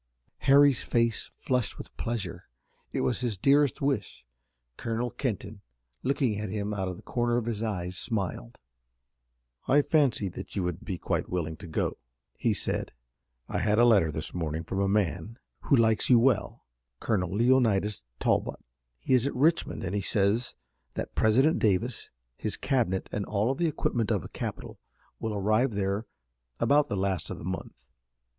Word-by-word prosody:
Harry's 140 -2 +6
face 115 -2 0
flushed 125 -5 -1
with - - -10
pleasure. 115 -7 -4 0.4
It - - -1
was 120 - +1
his 120 -5 -1
dearest 140 +6 +3
wish. 135 -8 -1 0.5
Colonel 115 - -2
Kenton, 110 -5 -4 0.4
looking 130 -6 0
at 105 -1 -3
him 105 +1 -2
out 95 -2 -2
of 90 - -4
the - - -14
corner 120 -1 0
of 120 - -1
his 115 -3 -2
eyes, 90 -5 -2
smiled. 95 - -3 1.1
"I 145 +2 +5
fancied 130 - +2
that - - -8
you 95 - 0
would 90 0 -3
be 95 - -4
quite - - -2
willing 80 -3 -2
to 95 - -10
go," 80 - -2 0.4
he - - +1
said. - - -2 0.5
"I - - -2
had 105 0 +2
a 120 - +6
letter 100 -9 +5
this 80 +1 -4
morning 80 -2 -2
from 95 +3 -3
a 100 - +2
man 100 +1 0 0.3
who - - +5
likes 110 -3 +3
you 125 - +8
well, 115 -1 +1 0.3
Colonel 90 -6 0
Leonidas 105 - +2 0.2
Talbot. - - +1 0.4
He 130 - 0
is 130 +1 +4
at - - -3
Richmond 155 0 +1
and 95 -1 -3
he 100 - 0
says 105 +4 +1 0.4
that - - -4
President 130 +9 +3
Davis, 110 +4 0 0.3
his - - -2
cabinet, 115 -9 0
and 105 - -2
all 105 +5 +1
the 170 +5 0
equipment 120 -7 -1
of - - +1
a - - -8
capital - - -6 0.4
will 110 -1 -3
arrive 110 +4 +2
there 100 +2 -1 0.5
about 145 +1 +4
the 100 - -2
last 95 -3 -1
of - - -5
the - - -8
month. 95 +1 -5
110 Hz, 165 wpm, -28 LUFS, 95-125 Hz, 1.1 s, you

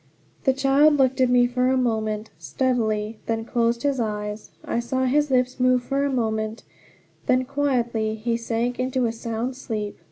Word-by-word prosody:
The 265 - +4
child 275 +3 +4
looked 265 -1 +2
at 255 - +4
me 245 0 +5
for 250 +1 0
a 260 - +2
moment 220 -3 -1
steadily, 220 -4 -1
then 225 0 -1
closed 235 0 0
his 280 -2 +1
eyes. 210 -1 -3 0.2
I - - -1
saw 260 +2 -1
his 295 +3 +2
lips 255 0 +1
move 255 0 +3
for 275 +2 -1
a 280 - 0
moment; 220 -3 -2 0.6
then 255 0 +3
quietly 240 -6 0
he 230 +2 -1
sank 235 +1 -2
into 255 0 0
a 230 - 0
sound 230 +2 -4
sleep. 215 -5 -5
245 Hz, 170 wpm, -24 LUFS, 225-260 Hz, 0.6 s, me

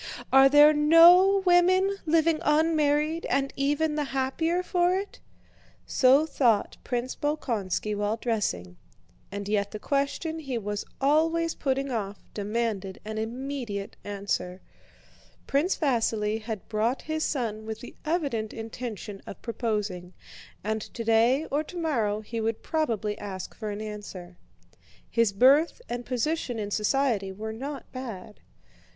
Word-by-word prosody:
Are 270 0 +8
there 295 +2 +7
no 345 +6 +7
women 370 +2 +4
living 320 0 +3
unmarried, 305 +1 +2
and 275 0 0
even 290 +3 +1
the 300 -1 -1
happier 280 +7 -1
for 355 0 +2
it?" 400 +1 -6 0.7
So 270 +4 +4
thought 240 -9 +1
Prince 245 +1 -3
Bolkónski 225 - -2
while 205 +2 -1
dressing, 90 - -2 0.5
and 200 0 -5
yet 205 -1 0
the 215 - -6
question 280 +6 -2
he 270 -6 -4
was 205 -1 -4
always 325 +4 +2
putting 275 -1 -1
off 205 -4 -4
demanded 205 -2 -2
an 215 0 -4
immediate 235 -3 -4
answer. 200 -2 -3 0.9
Prince 300 +7 +1
Vasíli 225 -6 0
had 215 -2 -6
brought 230 +4 -1
his 315 0 -2
son 220 -6 -2
with 220 0 -5
the 245 - -10
evident 280 -10 -1
intention 225 -3 -6
of - - -8
proposing, 210 -6 -3 0.5
and 220 +1 -1
today 230 +6 +2
or 290 +2 +1
tomorrow 275 - -1
he 225 +1 -5
would 225 0 -2
probably 225 -10 -1
ask 190 -3 -6
for 215 -2 -6
an 205 +1 -5
answer. 200 -4 -8 0.7
His 230 -3 +2
birth 270 - +4
and 240 0 -5
position 255 0 -1
in 205 -1 -4
society 215 -2 +1
were 220 +3 -6
not 275 +5 -7
bad. 225 -6 -8
240 Hz, 130 wpm, -27 LUFS, 210-300 Hz, 0.9 s, Are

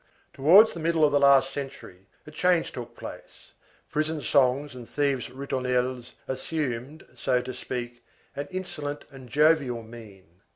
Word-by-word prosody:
Towards 185 +11 +6
the 170 - -7
middle 165 -1 +3
of 145 - +2
the 145 - +3
last 140 -1 +5
century 135 -9 -8 0.2
a 150 - -11
change 180 +2 +2
took 120 -1 -8
place, - - -11 0.4
prison 155 +1 -1
songs 140 0 +2
and 125 -2 -10
thieves' 140 -4 0
ritournelles 125 -1 -2
assumed, 135 0 -4
so 125 0 +1
to 130 +1 -6
speak, 120 -2 -6 0.3
an 140 +1 -4
insolent 150 -6 -5
and 130 -2 -12
jovial 145 -5 +3
mien. 100 -6 -14
135 Hz, 140 wpm, -26 LUFS, 125-150 Hz, 0.4 s, Towards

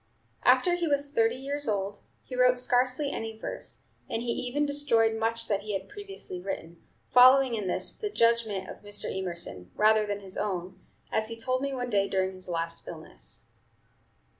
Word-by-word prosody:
After 355 - +4
he 350 -1 0
was 285 -1 +1
thirty 230 -3 +2
years 280 +2 -3
old, 200 -1 -1 0.2
he 255 - -7
wrote 250 0 +5
scarcely 255 +3 +3
any 225 0 -5
verse, - - -5 0.3
and 225 - -2
he 240 - -1
even 260 +5 -1
destroyed 260 -6 +2
much 230 +1 0
that 200 -2 0
he 210 0 -5
had 195 - -3
previously 405 - -7
written, 170 -3 -6 0.3
following 255 +1 +7
in 210 -4 -2
this - - 0
the 420 - -3
judgment 230 - +2
of - - -9
Mr. 205 -2 -2
Emerson, 170 - -4
rather 215 0 +4
than 205 0 -3
his 190 -1 -8
own, 185 -2 -3 0.3
as 220 0 0
he 230 0 -6
told 255 +2 -1
me 280 0 -1
one 250 -2 -3
day 200 -1 +2
during 190 0 0
his 185 -1 -9
last 165 -1 -3
illness. - - -5
225 Hz, 180 wpm, -28 LUFS, 195-255 Hz, 0.3 s, following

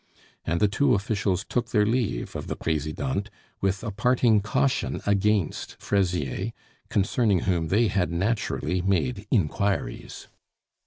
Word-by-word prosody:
And 85 +1 0
the 105 - +4
two 130 +5 +2
officials 100 -2 -1
took 120 -1 -1
their 105 -2 +3
leave 110 - -1
of - - -5
the - - -3
Presidente 80 - -2 0.3
with 95 +1 0
a 115 - -3
parting 115 0 +3
caution 130 +6 0
against 100 -3 0
Fraisier, 95 - -1 0.4
concerning 100 -1 +2
whom 85 -4 0
they 110 +7 +3
had 95 -2 0
naturally 95 -1 -1
made 100 +3 0
inquiries. 95 - -1
100 Hz, 125 wpm, -26 LUFS, 90-110 Hz, 0.4 s, the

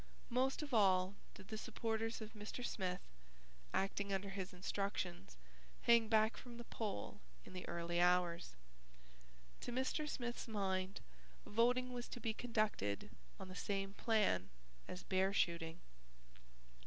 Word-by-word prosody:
Most 260 +4 +2
of 285 -3 -6
all 190 -3 +5 0.2
did 195 -1 -12
the 220 - -3
supporters 225 0 -1
of 220 0 -6
Mr. 215 +3 -5
Smith, 180 -5 -1 0.7
acting 200 +1 0
under 195 0 0
his 195 -1 -4
instructions, 180 - -2 0.5
hang 235 -1 +6
back 220 0 +4
from 240 -2 -9
the 240 - -6
poll 210 - -4 0.2
in - - -11
the 180 - -5
early 170 0 0
hours. 175 - +3 1.0
To - - -4
Mr. 260 +5 0
Smith's 240 -2 -3
mind, 190 -3 -1 0.4
voting 250 +3 +3
was 245 0 -4
to - - -6
be 225 -2 0
conducted 215 - 0 0.3
on - - -6
the 185 - -8
same 195 0 -1
plan 205 - +2 0.4
as 180 - -6
bear 190 +1 +2
shooting. 170 -3 +1
200 Hz, 135 wpm, -40 LUFS, 185-230 Hz, 1.0 s, hang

